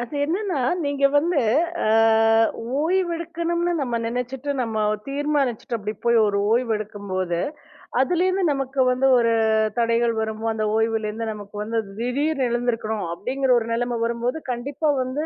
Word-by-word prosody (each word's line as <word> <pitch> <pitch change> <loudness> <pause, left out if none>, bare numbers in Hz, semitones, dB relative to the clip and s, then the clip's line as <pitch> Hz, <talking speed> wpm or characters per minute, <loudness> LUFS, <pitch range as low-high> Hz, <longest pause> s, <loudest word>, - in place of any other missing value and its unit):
அது 240 +4 -6
என்னன்னா 360 +1 -1 0.3
நீங்க 285 -1 -1
வந்து 325 +2 +2 0.5
அ - - +1 0.9
ஓய்வெடுக்கணும்னு 340 0 -1
நம்ம 240 -4 -1
நினைச்சுட்டு, 250 +3 -3
நம்ம 225 -3 -1 0.3
தீர்மானிச்சுட்டு 275 -5 -1
அப்படி 210 +1 -4
போய் 235 -1 +4
ஒரு 200 -1 +1
ஓய்வெடுக்கும் 215 -4 -2
போது, 185 -2 -1 0.6
அதுல 345 +6 +2
இருந்து, 375 +1 0
நமக்கு 270 -1 -1
வந்து 255 +2 +2
ஒரு 230 -1 +3 0.5
தடைகள் 230 0 +2
வரும். 220 0 -4
அந்த 215 -1 -1
ஓய்வுல 225 -1 +1
இருந்து, 225 +1 -4
நமக்கு 205 0 -11
வந்து 225 +2 -1 0.2
திடீர் 275 +5 -1
எழுந்திருக்கனும் 235 -3 -1
அப்படிங்கற 260 +8 -1
ஒரு 225 - -6
நெலைமை 240 0 -1
வரும்போது, 235 +5 -2
கண்டிப்பா 280 +5 -1
வந்து 265 +5 -3
245 Hz, 140 wpm, -23 LUFS, 225-290 Hz, 0.9 s, போய்